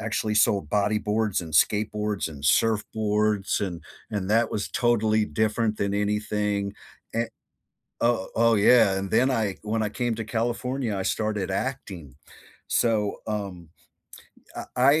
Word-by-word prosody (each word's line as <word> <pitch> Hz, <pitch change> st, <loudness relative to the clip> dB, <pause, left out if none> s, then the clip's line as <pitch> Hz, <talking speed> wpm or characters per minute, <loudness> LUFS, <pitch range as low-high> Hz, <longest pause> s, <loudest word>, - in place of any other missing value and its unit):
actually 110 Hz, 0 st, -1 dB
sold 100 Hz, -6 st, +3 dB
bodyboards 105 Hz, 0 st, +1 dB
and 80 Hz, -2 st, -8 dB
skateboards 105 Hz, +4 st, +1 dB
and 75 Hz, -3 st, -10 dB
surfboards, 105 Hz, +1 st, +1 dB
and 90 Hz, -5 st, -4 dB, 0.3 s
and 100 Hz, -3 st, -3 dB
that 115 Hz, +1 st, +3 dB
was 105 Hz, -, -2 dB
totally 110 Hz, -3 st, +2 dB
different 110 Hz, 0 st, 0 dB
than 100 Hz, 0 st, -1 dB
anything, 105 Hz, -1 st, -1 dB, 0.4 s
an 115 Hz, 0 st, 0 dB, 0.7 s
Oh 115 Hz, -5 st, +1 dB
oh 115 Hz, 0 st, +4 dB
yeah. 105 Hz, 0 st, +5 dB
And 95 Hz, 0 st, -3 dB
then 130 Hz, +4 st, +3 dB
I 110 Hz, -6 st, 0 dB
when 110 Hz, +1 st, -1 dB
I 105 Hz, -, 0 dB
came 120 Hz, +2 st, -1 dB
to 115 Hz, -, -4 dB
California, 120 Hz, +1 st, -2 dB
I 95 Hz, -, -2 dB
started 105 Hz, -3 st, -1 dB
acting. 95 Hz, -, -4 dB, 0.5 s
So, 110 Hz, -3 st, +1 dB
um, 100 Hz, -6 st, -5 dB, 0.9 s
uh -, -, -5 dB
I 125 Hz, +1 st, +3 dB
105 Hz, 135 wpm, -25 LUFS, 100-115 Hz, 0.9 s, yeah